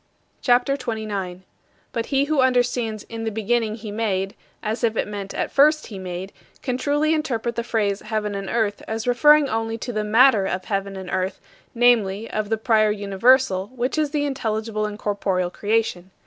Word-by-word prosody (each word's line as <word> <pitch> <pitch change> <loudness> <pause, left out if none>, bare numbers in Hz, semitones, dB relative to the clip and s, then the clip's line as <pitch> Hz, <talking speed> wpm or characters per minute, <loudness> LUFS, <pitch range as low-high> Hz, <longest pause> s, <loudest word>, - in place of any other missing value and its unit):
CHAPTER 250 +2 +3
XXIX 220 -5 -4
40. 185 -2 -4 0.5
But 230 -1 -3
he 275 -1 +2
who 290 -1 +2
understands 245 -4 +1
"In 225 0 -7
the 225 - -1
beginning 220 +1 0
he 215 -2 -7
made" 195 -3 -1 0.3
as 220 +3 -3
if 225 -1 +1
it - - 0
meant, 200 -2 -6
"At - - -2
first 305 +2 +4
he 200 -4 -8
made," 185 +1 -6 0.3
can 250 -3 -1
truly 295 +4 +1
interpret 240 -7 -1
the 235 - -2
phrase 210 -4 0
"heaven 215 -1 -3
and 195 -1 -4
earth" 220 -3 0
as 220 0 -3
referring 295 +4 +5
only 225 -1 -2
to 245 +2 -5
the 215 -1 -1
"matter" 220 -1 +5
of 185 0 -3
heaven 195 -1 -2
and 190 -1 -7
earth, 185 0 -1 0.4
namely, 225 -3 +3
of 215 -1 -2
the 225 - +1
prior 220 -1 +3
universal, 200 0 +2
which 250 +1 -1
is 305 -2 +1
the 290 0 -1
intelligible 220 -5 -2
and 210 0 -7
corporeal 195 -4 -1
creation. 205 -4 -1
220 Hz, 185 wpm, -23 LUFS, 205-245 Hz, 0.5 s, referring